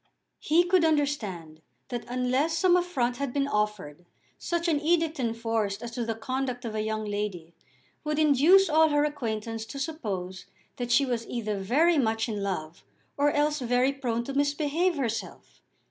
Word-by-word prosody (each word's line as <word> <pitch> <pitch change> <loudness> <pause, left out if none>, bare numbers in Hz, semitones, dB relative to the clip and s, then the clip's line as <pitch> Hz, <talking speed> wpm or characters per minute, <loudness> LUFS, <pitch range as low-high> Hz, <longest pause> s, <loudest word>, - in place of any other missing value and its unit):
He 330 +3 +3
could 355 0 +3
understand 215 - -1 0.3
that 240 -1 -4
unless 255 +6 0
some 360 +1 +4
affront 270 -10 0
had 280 -1 -2
been 275 +1 0
offered 210 - -2 0.4
such 340 0 -2
an 305 -3 +1
edict 325 -1 +1
enforced 225 -4 -1
as 235 - -5
to 240 0 -3
the 225 -1 -2
conduct 255 +1 -3
of 225 - -4
a 215 - -1
young 215 0 -2
lady 205 -5 -4 0.5
would 300 0 -2
induce 310 +6 +5
all 320 0 +4
her 290 0 +2
acquaintance 225 -6 -3
to 280 - -8
suppose 200 - -4 0.3
that 245 -1 -3
she 275 +3 +4
was 240 -3 -3
either 215 -4 -3
very 295 - +3
much 225 -2 0
in 210 -3 -3
love 175 -5 -4 0.3
or 290 +1 +3
else 295 +1 +1
very 250 +2 +2
prone 240 -4 -2
to 275 - -6
misbehave 290 +5 +1
herself. 230 -6 -5
250 Hz, 165 wpm, -27 LUFS, 220-300 Hz, 0.5 s, induce